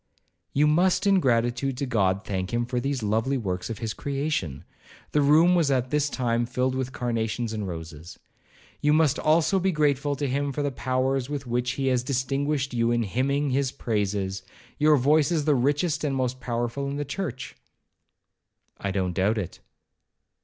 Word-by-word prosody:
'You 145 Hz, +2 st, +3 dB
must, 175 Hz, +6 st, +3 dB
in 195 Hz, -1 st, +5 dB
gratitude 125 Hz, 0 st, +1 dB
to 140 Hz, -, -1 dB
God, 100 Hz, -5 st, +1 dB
thank 95 Hz, -2 st, -3 dB
him 120 Hz, 0 st, 0 dB
for 125 Hz, +1 st, -2 dB
these 135 Hz, -2 st, -2 dB
lovely 110 Hz, +6 st, +1 dB
works 95 Hz, -5 st, -3 dB
of 115 Hz, -, -4 dB
his 110 Hz, 0 st, -3 dB
creation;'—the 140 Hz, -, -4 dB
room 155 Hz, +5 st, +5 dB
was 170 Hz, -5 st, +3 dB
at 130 Hz, -2 st, 0 dB
this 150 Hz, -1 st, +1 dB
time 120 Hz, -3 st, 0 dB
filled 130 Hz, +1 st, 0 dB
with 130 Hz, -1 st, -2 dB
carnations 115 Hz, -2 st, -2 dB
and 105 Hz, -3 st, -3 dB
roses;—'you 80 Hz, -, -6 dB
must 155 Hz, -3 st, +3 dB
also 160 Hz, +4 st, +3 dB
be 190 Hz, +1 st, +1 dB
grateful 145 Hz, -2 st, +1 dB
to 145 Hz, +1 st, -2 dB
him 140 Hz, +2 st, -1 dB
for 145 Hz, -, -2 dB
the 145 Hz, -, 0 dB
powers 130 Hz, +2 st, -1 dB
with 145 Hz, -2 st, -4 dB
which 125 Hz, +1 st, -1 dB
he 135 Hz, -, -3 dB
has 130 Hz, -2 st, +2 dB
distinguished 135 Hz, +2 st, -1 dB
you 115 Hz, -1 st, +1 dB
in 120 Hz, 0 st, +1 dB
hymning 135 Hz, +7 st, 0 dB
his 135 Hz, 0 st, +1 dB
praises—your 105 Hz, +7 st, -1 dB
voice 150 Hz, +5 st, +3 dB
is 155 Hz, -4 st, 0 dB
the 150 Hz, -, +4 dB
richest 145 Hz, +6 st, +1 dB
and 140 Hz, -3 st, 0 dB
most 130 Hz, -1 st, -1 dB
powerful 120 Hz, +2 st, -2 dB
in 140 Hz, -, -3 dB
the 145 Hz, 0 st, -3 dB
church.' 140 Hz, -4 st, -5 dB, 1.2 s
'I 100 Hz, -, -2 dB
don't 95 Hz, -2 st, -1 dB
doubt 100 Hz, +5 st, +1 dB
it.' 95 Hz, -5 st, -5 dB
130 Hz, 170 wpm, -26 LUFS, 115-145 Hz, 1.2 s, in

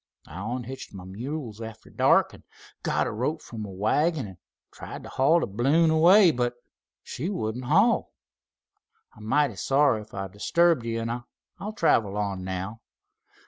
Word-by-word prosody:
I 80 Hz, +3 st, -9 dB
onhitched 120 Hz, +2 st, -6 dB
my 95 Hz, -, -8 dB
mules 115 Hz, +4 st, -6 dB
arter 110 Hz, -1 st, -9 dB
dark, -, -, +3 dB
an' -, -, -15 dB, 0.4 s
got -, -, 0 dB
a -, -, -2 dB
rope 130 Hz, +9 st, -2 dB
from 115 Hz, -6 st, -9 dB
my 105 Hz, -, -5 dB
wagon, 130 Hz, -, +1 dB
an' 95 Hz, -, -13 dB, 0.3 s
tried -, -, -9 dB
t' -, -, -9 dB
haul 150 Hz, +6 st, +3 dB
th' 100 Hz, -, -4 dB
balloon 155 Hz, +8 st, +3 dB
away. 175 Hz, +4 st, +6 dB
But 120 Hz, -2 st, -1 dB, 0.5 s
she 160 Hz, +9 st, -4 dB
wouldn't 125 Hz, -, -3 dB
haul. 195 Hz, -, +3 dB, 1.0 s
I'm 105 Hz, -, -12 dB
mighty 135 Hz, -2 st, +1 dB
sorry 135 Hz, -3 st, +2 dB
if 105 Hz, -, -13 dB
I 95 Hz, 0 st, -3 dB
disturbed 125 Hz, -, +2 dB
ye' 115 Hz, 0 st, -1 dB
an' 115 Hz, +1 st, -3 dB, 0.4 s
I'll 210 Hz, +3 st, -5 dB
travel 105 Hz, -, +2 dB
on 100 Hz, -3 st, -2 dB
now. 95 Hz, +4 st, -5 dB
120 Hz, 160 wpm, -26 LUFS, 105-155 Hz, 1.0 s, away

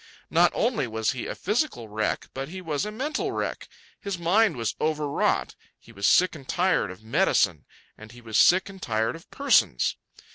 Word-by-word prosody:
Not -, -, +4 dB
only 235 Hz, -, 0 dB
was 110 Hz, -1 st, -1 dB
he 130 Hz, -3 st, -5 dB
a -, -, -4 dB
physical 210 Hz, -, -1 dB
wreck, 110 Hz, +1 st, -2 dB
but 135 Hz, +2 st, -5 dB
he 185 Hz, +3 st, -7 dB
was 165 Hz, +1 st, -2 dB
a -, -, -5 dB
mental 275 Hz, +8 st, -2 dB
wreck. -, -, -4 dB, 0.3 s
His 200 Hz, -3 st, -4 dB
mind 190 Hz, -, +2 dB
was 115 Hz, -3 st, -1 dB
overwrought. 150 Hz, -2 st, 0 dB, 0.2 s
He -, -, -18 dB
was 100 Hz, +1 st, -1 dB
sick 185 Hz, +1 st, +4 dB
and 140 Hz, -5 st, -11 dB
tired 180 Hz, -, +1 dB
of 95 Hz, +4 st, -11 dB
medicine, 110 Hz, -, +1 dB, 0.3 s
and 110 Hz, 0 st, -12 dB
he 120 Hz, -, -13 dB
was 115 Hz, -2 st, -1 dB
sick 185 Hz, +2 st, +5 dB
and 195 Hz, -1 st, -11 dB
tired 110 Hz, +2 st, -1 dB
of 165 Hz, -, -14 dB
persons. -, -, +2 dB
150 Hz, 185 wpm, -26 LUFS, 110-190 Hz, 0.3 s, sick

